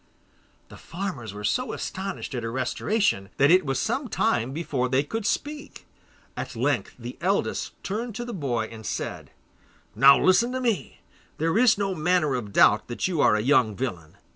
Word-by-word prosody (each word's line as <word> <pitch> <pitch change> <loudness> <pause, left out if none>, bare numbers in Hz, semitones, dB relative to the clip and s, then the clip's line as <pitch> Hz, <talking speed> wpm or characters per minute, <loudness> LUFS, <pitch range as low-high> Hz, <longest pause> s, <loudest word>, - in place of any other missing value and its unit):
The - - -12
farmers 170 - -6
were 105 +1 -9
so 250 - -1
astonished 190 -5 -5
at 125 - -3
her 115 0 -4
restoration, 130 - 0
that 140 +3 +5
it 185 +1 +6
was 135 -1 0
some 275 -1 -1
time 130 - 0
before 135 -4 -2
they 130 +2 +2
could 225 +8 -3
speak. 295 +4 -4 0.5
At - - -6
length - - -1
the - - -9
eldest - - -1
turned 220 +3 -4
to 240 - -4
the 240 - -6
boy 130 - -1
and 110 0 -11
said: - - -5 0.6
'Now 140 +1 +7
listen 235 +7 +3
to 260 - -1
me. 235 -6 -2 0.4
There 165 +3 0
is 230 -1 +5
no 195 -1 -1
manner 170 -3 +1
of 115 -5 -4
doubt 105 +2 +4
that 120 - -2
you 170 -5 0
are 105 - +5
a 105 - +1
young 120 -4 +3
villain. 90 -11 -5
155 Hz, 180 wpm, -25 LUFS, 120-205 Hz, 0.6 s, Now